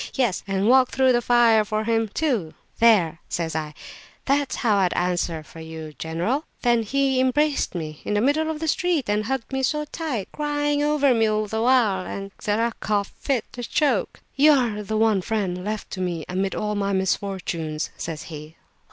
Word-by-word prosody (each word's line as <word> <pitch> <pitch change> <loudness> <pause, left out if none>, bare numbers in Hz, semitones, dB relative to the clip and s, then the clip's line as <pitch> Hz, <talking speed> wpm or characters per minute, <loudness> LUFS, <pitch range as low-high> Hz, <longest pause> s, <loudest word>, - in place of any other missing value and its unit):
Yes, 240 -8 +1
and 195 +1 0
walk 255 +1 +5
through 260 -1 +3
the 240 - +2
fire 235 -2 +4
for 215 +1 -2
him, 225 0 +1
too." 220 - -1 0.2
There,' 200 -9 +4
says 165 -2 -2
I, 155 -1 -3 0.5
'that's 280 0 +1
how 220 -5 +2
I'd 185 -3 +2
answer 175 -3 -1
for 165 - -13
you, 160 -1 -8
general!' 175 - -1 0.2
Then 240 -2 +3
he 265 +3 +1
embraced 275 -1 +1
me, 155 -3 -5
in 210 - -2
the 205 - +2
middle 300 +5 +2
of 315 -1 -3
the 320 - -3
street, 330 -4 +1
and 210 +1 0
hugged 265 +1 -3
me 265 - 0
so 300 +3 0
tight 295 - -4
(crying 295 -1 0
over 295 -2 +3
me 225 -1 +3
all 215 0 0
the 220 +2 -3
while) 230 -7 +3 0.4
that 210 +1 +1
I 235 +1 +1
coughed 205 -2 -1
fit 255 -5 -1
to 245 - -6
choke! 290 +4 0
'You 300 +2 +6
are 235 -6 +1
the 215 +1 -3
one 220 -3 +3
friend 185 -3 -2
left 215 +1 -4
to 185 - -4
me 175 -3 -2
amid 190 +2 -2
all 210 0 -2
my 200 -1 -1
misfortunes,' 180 -5 -2
says 160 -2 -5
he. 155 0 -9
220 Hz, 190 wpm, -23 LUFS, 185-265 Hz, 0.5 s, You